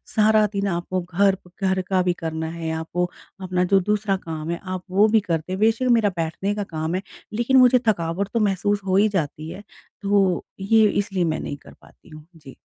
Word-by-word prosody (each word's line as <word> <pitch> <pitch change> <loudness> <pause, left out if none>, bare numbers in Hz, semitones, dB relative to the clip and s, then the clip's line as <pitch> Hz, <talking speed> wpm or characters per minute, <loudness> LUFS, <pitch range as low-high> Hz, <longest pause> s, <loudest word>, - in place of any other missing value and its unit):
सारा 215 0 +5
दिन 200 0 -1
आपको 180 0 -2
घर 190 +3 +2
प 180 - -16
घर 190 0 +2
का 190 -1 +3
भी 180 -1 +1
करना 160 -2 -4
है, 165 -1 -4
आपको 165 +2 -2 0.3
अपना 180 -1 0
जो 195 +2 +4
दूसरा 210 +1 0
काम 160 -3 -6
है 170 - -2
आप 185 -1 -5
वो 200 +3 +5
भी 220 +1 +4
करते 170 -3 -3
हैं, 190 - -3
बेशक 225 +4 +2
मेरा 225 -3 +4
बैठने 165 +5 -2
का 205 - -2
काम 160 -2 -3
है, 185 - -1 0.3
लेकिन 240 +4 +2
मुझे 250 0 +6
थकावट 175 -1 0
तो 230 - +1
महसूस 205 0 +1
हो 190 0 +2
ही 210 +2 +5
जाती 160 -4 -3
है, 190 +4 -9 0.4
तो 195 -3 +2
ये 215 +2 +4
इसलिए 200 -3 -1
मैं 160 -2 -1
नहीं 145 - -5
कर - - -16
पाती - - -21
हूँ। 155 -1 -12
जी। 150 -4 -14
190 Hz, 215 wpm, -23 LUFS, 170-205 Hz, 0.4 s, मुझे